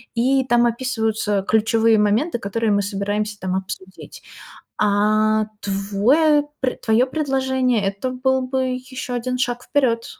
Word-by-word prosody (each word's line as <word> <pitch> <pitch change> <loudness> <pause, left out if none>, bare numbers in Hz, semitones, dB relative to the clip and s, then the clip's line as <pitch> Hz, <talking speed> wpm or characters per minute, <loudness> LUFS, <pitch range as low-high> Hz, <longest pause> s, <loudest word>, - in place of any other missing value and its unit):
и 260 +3 +2
там 240 -1 +3
описываются 220 -4 -1
ключевые 225 0 +3
моменты, 225 +8 +1
которые 220 +2 -1
мы 200 0 +2
собираемся 205 +1 -3
там 185 0 -2
обсудить. 190 0 -7 0.6
А 215 +1 +2
твой 215 +11 +2 0.2
пр 255 - -1
твоё 225 +3 +3
предложение- 260 -5 0
это 200 +6 -2
был 260 +1 0
бы 260 0 -1 0.3
ещё 255 -1 -5
1 255 +1 -2
шаг 245 -1 -1
вперёд 235 -5 0
230 Hz, 130 wpm, -21 LUFS, 205-260 Hz, 0.6 s, там